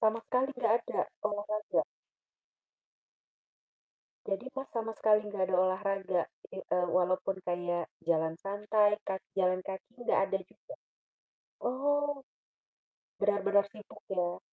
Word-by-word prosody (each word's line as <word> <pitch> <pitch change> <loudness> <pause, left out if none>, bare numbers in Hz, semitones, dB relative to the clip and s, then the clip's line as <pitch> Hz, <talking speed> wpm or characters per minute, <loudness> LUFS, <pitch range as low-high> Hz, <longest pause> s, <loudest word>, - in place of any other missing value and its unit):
sama 220 0 +3
sekali 255 +2 +2
nggak 230 -3 +3
ada - - -3 0.3
olahraga? 210 +1 0 2.4
Jadi 200 +6 -2
Mas, 270 - -2
sama 225 -1 -1
sekali 215 -1 +5
nggak 200 -2 -1
ada 185 0 +1
olahraga 190 -1 +1 0.3
i - - -9
eee, 180 -1 0
walaupun 185 +1 +1
kayak 175 -1 -1 0.2
jalan 160 -1 +3
santai, 210 +1 +3
ka 190 -1 -1 0.2
jalan 185 0 +3
kaki 190 0 -7
nggak - - +3
ada 195 - 0
juga? - - -13 0.9
Oh, 285 +2 0 0.9
benar-benar 200 0 +4
sibuk 210 -1 -13
ya. 175 -1 0
200 Hz, 115 wpm, -32 LUFS, 185-220 Hz, 2.4 s, sekali